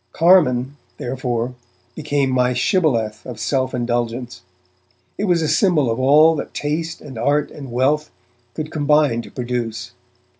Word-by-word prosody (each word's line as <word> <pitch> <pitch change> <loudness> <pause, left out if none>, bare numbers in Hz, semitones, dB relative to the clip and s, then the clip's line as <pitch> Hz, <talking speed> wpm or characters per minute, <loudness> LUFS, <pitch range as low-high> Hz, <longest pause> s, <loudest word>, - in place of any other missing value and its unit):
'Carmine', 145 -7 +3 0.2
therefore, 125 -1 -3 0.4
became 145 -3 -1
my 125 0 +2
shibboleth 125 - 0
of 125 -4 -8
self 130 +2 0
indulgence; 120 0 -3 0.7
it 205 - -2
was 175 -4 +2
a - - 0
symbol 155 - +2
of 115 - -2
all 150 +5 +6
that - - -6
taste 160 +3 -3
and 130 -6 -9
art 145 +4 +1
and 140 -4 -9
wealth 140 +5 +1 0.5
could 155 0 -5
combine 150 -5 +2
to - - -12
produce. 120 -1 -4
130 Hz, 140 wpm, -20 LUFS, 120-150 Hz, 0.7 s, all